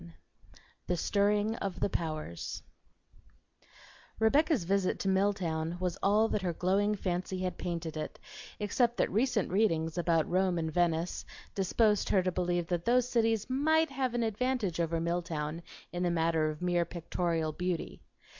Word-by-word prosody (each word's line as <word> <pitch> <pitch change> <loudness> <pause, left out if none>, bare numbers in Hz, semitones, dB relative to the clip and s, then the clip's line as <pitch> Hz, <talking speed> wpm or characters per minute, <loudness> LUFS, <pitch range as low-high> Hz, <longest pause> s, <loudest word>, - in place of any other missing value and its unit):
XI 170 -1 -13 0.7
"THE 180 - 0
STIRRING 205 +4 +2
OF 185 -3 -4
THE - - +1
POWERS" 155 - -4 1.5
Rebecca's 280 - +3
visit 195 +1 +1
to - - -2
Milltown 180 -4 0
was 180 -2 -1
all 210 +3 +4
that 210 - 0
her 180 -2 -1
glowing 200 +5 +1
fancy 185 -1 -2
had 180 -2 -3
painted 170 -2 -3
it, 155 - -5 0.4
except 235 +3 +1
that - - +1
recent 220 -2 +1
readings 165 -5 +1
about 165 -2 +2
Rome 185 0 +1
and 160 -1 -2
Venice 170 0 0 0.3
disposed 210 +2 +2
her 190 - +3
to 185 - 0
believe 175 -1 0
that 175 0 -2
those 245 +1 +3
cities 225 -3 +1
might 315 +4 +2
have 260 -3 -1
an 240 - +1
advantage 220 -4 -1
over 165 0 0
Milltown 165 -2 -2 0.3
in 175 - -2
the 180 - +2
matter 165 -2 +1
of 155 +3 -6
mere 175 -1 +2
pictorial 170 -1 -2
beauty. 180 +1 -3
180 Hz, 155 wpm, -31 LUFS, 170-210 Hz, 1.5 s, all